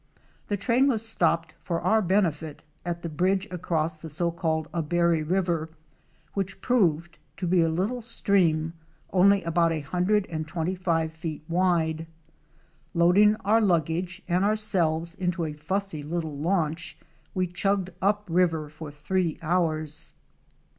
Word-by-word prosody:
The 205 - -1
train 235 +7 +3
was 225 -5 +2
stopped 165 -6 +1
for 170 -3 -2
our 220 0 +3
benefit 170 -6 0 0.2
at 170 -1 -4
the - - -2
bridge 185 +5 0
across 165 -2 -1
the 160 +1 -9
so 170 +3 0
called 160 -2 -1
Abary 170 0 +1
River, 170 -1 0 0.6
which 195 -1 -3
proved 170 -9 +1 0.2
to 185 - -3
be 175 0 +3
a 165 - +3
little 195 +10 -1
stream 175 -8 +1 0.4
only 195 +1 +5
about 165 0 +2
a 160 -2 -1
hundred 185 +7 +1
and 155 -1 -4
twenty 165 +3 -2
five 165 -3 0
feet 160 -2 -6
wide. 165 -2 +1 0.9
Load 170 +3 +5
ing 210 0 +6
our 220 +3 +4
luggage 175 0 0
and 180 +1 +2
ourselves 175 -6 +1
into 180 -2 -1
a 155 - -4
fussy 165 +1 -3
httle 155 -2 -4
launch 165 -2 -1 0.4
we 185 -1 +2
chugged 190 +1 -1
up 205 +1 +1
river 165 -3 +1
for 155 0 -9
three 165 +3 -1
hours. 155 -3 -1
170 Hz, 145 wpm, -26 LUFS, 160-190 Hz, 0.9 s, ing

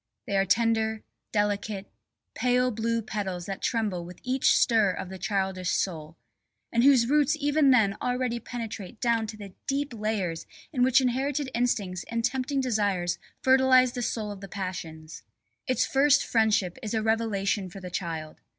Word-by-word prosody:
They 200 - -2
are 195 0 +3
tender, 220 0 +1 0.3
delicate, 205 -1 -1 0.5
pale 250 0 +2
blue 230 +1 -1
petals 190 -5 -4
that 195 +1 -5
tremble 215 -7 -1
with 180 +1 -11
each 260 +1 +3
stir 220 -4 +4
of 180 - -6
the 190 0 -8
childish 190 -1 -1
soul 160 -3 -3 0.5
and 235 0 +2
whose 265 -4 +6
roots 295 +4 +2
even 290 0 +3
then 220 -6 +4
already 250 -1 -1
penetrate 225 -2 -7
down 230 -2 +1
to 215 0 -7
the 200 -3 -10
deep 275 -1 -1
layers 210 -7 -2 0.3
in 255 - 0
which 260 +1 +5
inherited 265 +2 -1
instincts 205 -7 -1
and 230 0 -1
tempting 265 +2 -1
desires 205 -8 0 0.2
fertilise 260 -1 +5
the 245 - -4
soil 220 -2 -2
of 200 -1 -9
the 195 - -7
passions. 165 -5 -6 0.5
Its 255 - +2
first 280 +1 +3
friendship 215 -6 +1
is 215 +1 -3
a 220 - 0
revelation 210 -3 0
for 195 - -10
the 180 -1 -8
child. 165 -4 -5
220 Hz, 160 wpm, -27 LUFS, 195-250 Hz, 0.5 s, whose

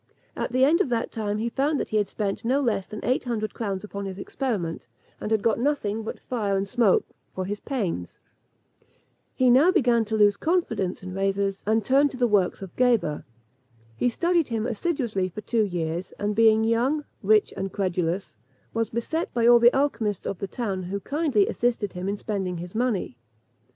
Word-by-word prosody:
At - - -3
the 255 +1 +4
end 320 +4 +4
of - - 0
that 235 -1 -1
time, 210 -2 -2
he 225 +2 -1
found 275 +5 0
that - - -3
he 215 - +1
had 205 -2 +1
spent 200 -2 -3
no 255 +4 +2
less 230 -8 0
than 215 - -7
eight 255 +3 +1
hundred 215 -4 -2
crowns 200 -4 -3
upon 200 -1 -6
his 190 -1 -6
experiment, 200 - -3 0.3
and - - -4
had 220 -2 +1
got 230 0 +2
nothing 235 -6 0
but 220 - -6
fire 210 -6 -1
and 195 +1 -1
smoke 230 -3 +3 0.3
for 185 - -2
his 205 +2 -4
pains. 190 - -3 1.2
He 255 -1 +4
now 285 +9 +6
began 245 - +3
to 220 +1 -1
lose 205 -1 +4
confidence 225 - -1
in 185 -1 -6
Rhazes, 195 0 -1
and 220 0 +2
turned 280 +2 +4
to 260 - -9
the 250 - +3
works 200 -4 +1
of 190 - -10
Geber. 230 -12 +2 0.7
He 245 - +1
studied 340 +5 +1
him 225 -2 -2
assiduously 235 - -1
for 200 +4 -7
two 230 +2 0
years; 175 -1 -3
and 205 0 -2
being 220 0 +5
young, 250 +7 +1 0.2
rich, 215 +1 +3
and 195 0 -3
credulous, 180 - -2 0.4
was 225 0 0
beset 275 +9 -2
by 235 -1 +2
all 240 0 +8
the 235 +1 +7
alchymists 230 -8 0
of 195 - -3
the 195 - -3
town, 195 -3 -3
who 185 +3 -4
kindly 280 - +1
assisted 230 -5 -1
him 180 +2 -3
in 205 - -2
spending 190 -4 -3
his 175 +1 -7
money. 220 - -1
215 Hz, 195 wpm, -25 LUFS, 195-245 Hz, 1.2 s, all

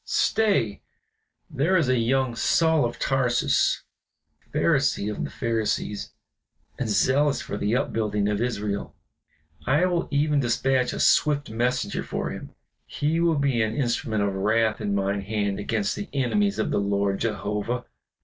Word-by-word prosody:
Stay! 200 - +1 0.7
there 165 +8 +1
is 165 - +2
the 130 -1 +2
young 130 +1 +1
Saul 160 +3 +3
of 120 - -4
Tarsus, 125 -3 +1 0.6
a - - -34
Pharisee 105 +1 +1
of 105 - -4
the - - -4
Pharisees, 110 -3 -2 0.7
and 125 -4 -2
zealous 135 +8 +2
for - - -5
the 105 +2 0
upbuilding 105 -5 0
of 105 +1 -1
Israel; 105 -4 -3 0.7
I 150 +7 +3
will 175 -2 0
even 145 0 +2
dispatch 125 +1 +1
a - - -5
swift 145 -4 +3
messenger 120 +3 -1
for - - -4
him. - - -9 0.3
He 155 +3 -1
will 170 -2 +2
be 140 -4 +1
an 110 0 -1
instrument 120 -4 0
of 100 -1 0
wrath 110 +3 +1
in 100 -1 -1
mine 100 0 0
hand 100 -1 -2
against 105 -1 -1
the 205 - -6
enemies 200 +10 +1
of - - -1
the - - +1
Lord 100 -1 0
Jehovah." 105 +2 -2
120 Hz, 150 wpm, -25 LUFS, 105-140 Hz, 0.7 s, Saul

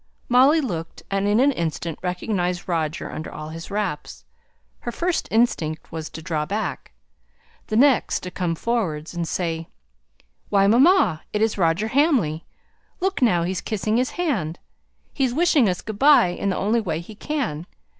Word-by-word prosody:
Molly 270 +6 +5
looked, 170 - -5
and 195 +1 +1
in 205 +2 +3
an 280 +3 +5
instant 165 - -3
recognized 180 0 -2
Roger 160 -3 -2
under 155 - -6
all 155 0 -7
his 165 +1 -8
wraps. 195 -7 -4 0.5
Her 240 - -4
first 345 +6 -1
instinct 170 -9 0
was 160 -1 -5
to 160 - -9
draw 155 -3 -1
back. 205 +7 -4 0.7
The 215 - -2
next 265 +1 +3
to 180 - -6
come 175 -2 -2
forwards, 170 -8 -2
and 170 -1 -3
say 165 -1 -2 0.8
"Why, 195 -1 +4
mamma, 235 - +4
it's 215 +1 +1
Roger 180 +4 +1
Hamley! 250 - +2 0.5
Look 385 -4 -1
now 180 -9 +3
he's 180 +1 -2
kissing 215 0 -1
his 255 +1 +1
hand; 215 - -1 0.6
he's 260 -3 0
wishing 305 - +4
us 180 - -3
good 215 -1 -6
by 280 -10 +6
in 175 +3 -2
the 190 - -1
only 225 +4 +1
way 165 -6 -2
he 170 +6 -10
can!" 210 - -3
195 Hz, 160 wpm, -23 LUFS, 165-240 Hz, 0.8 s, by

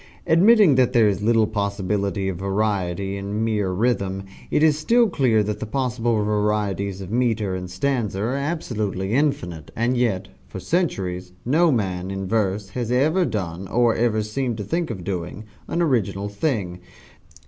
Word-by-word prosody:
Admitting 190 +1 +6
that 130 -1 +3
there 115 -4 +5
is 100 0 0
little 115 +1 +3
possibility 100 -1 -1
of 95 -3 -2
variety 100 -1 -1
in 100 +2 -3
mere 105 -4 0
rhythm, 95 -1 0 0.3
it 150 - +2
is 155 -2 +5
still 230 +10 +3
clear 125 - +2
that 105 0 -3
the - - -3
possible 120 -1 0
varieties 105 -2 -1
of 95 0 -7
metre 110 -5 +1
and 90 -1 -5
stanza 105 0 -1
are 115 +5 -1
absolutely 110 - -2
infinite, 90 - -1
and 120 +3 +1
yet, 115 -7 0 0.2
for - - -7
centuries, 95 - -2
no 160 +6 +4
man, 95 -6 -1
in 95 0 -4
verse, 100 -2 0
has 120 +2 -3
ever 155 +9 +3
done, 95 - -4
or 120 +1 +3
ever 110 -2 +1
seemed 120 +2 -2
to 105 - -4
think 165 - -2
of 95 -7 -5
doing, 90 +2 -4 0.2
an 170 - 0
original 105 - 0
thing. 100 - -2
105 Hz, 160 wpm, -23 LUFS, 95-125 Hz, 0.3 s, Admitting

